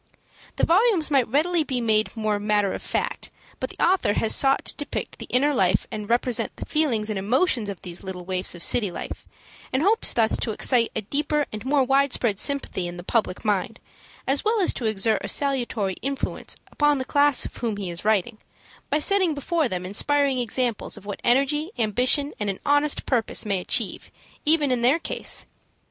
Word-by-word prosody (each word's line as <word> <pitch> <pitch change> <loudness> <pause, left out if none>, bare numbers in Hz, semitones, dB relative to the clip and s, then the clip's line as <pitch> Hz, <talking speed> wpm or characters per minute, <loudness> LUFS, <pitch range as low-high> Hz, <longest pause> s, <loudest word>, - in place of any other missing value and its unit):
The - - -3
volumes 360 -3 +3
might 270 -4 +3
readily 320 +6 +1
be 260 -4 -3
made 220 -1 0
more 215 -2 0
matter 205 -1 +1
of - - -5
fact, - - -3 0.3
but - - -3
the - - -11
author 365 - +2
has 220 - +1
sought 270 0 +3
to - - -2
depict 290 - -5
the - - -7
inner 285 +4 +2
life 190 -6 +2
and 210 -1 -6
represent 240 0 0
the - - -7
feelings 235 -9 0
and 200 - -2
emotions 240 - +1
of 195 - -8
these 175 -1 -5
little 185 -2 -7
waifs 185 -1 +2
of 170 - 0
city 210 -5 +2
life, 175 - -7 0.4
and 260 +3 0
hopes 435 +5 +3
thus 225 -2 +1
to - - -2
excite 235 +1 +2
a 220 - 0
deeper 295 +6 -1
and 215 +2 -6
more 275 0 +3
widespread 260 -5 +1
sympathy 280 -10 0
in 175 0 -7
the 175 - -8
public 215 0 -1
mind, 210 +2 -1 0.5
as 275 +1 +1
well 440 +1 +1
as 370 - +3
to 240 - -5
exert 215 0 +1
a - - -3
salutary 240 -9 -1
influence 275 +1 -3 0.2
upon 295 -1 +2
the 260 - -3
class 285 -1 +3
of - - -8
whom 225 -4 -2
he 190 -3 -4
is 170 - -7
writing, 215 +1 0 0.5
by 295 - +2
setting 370 0 +2
before 315 +1 0
them 180 -2 -3
inspiring 275 +7 +1
examples 240 -2 -1
of 205 - -13
what 205 -1 -6
energy, 280 +6 +2
ambition, 250 +6 +2
and 205 -1 -2
an 195 - -4
honest 290 +1 +2
purpose 235 -5 -1
may 200 -3 0
achieve, - - -1 0.4
even 300 -3 +3
in 250 -2 0
their 255 +6 +4
case. 335 - -2
245 Hz, 195 wpm, -24 LUFS, 210-290 Hz, 0.5 s, their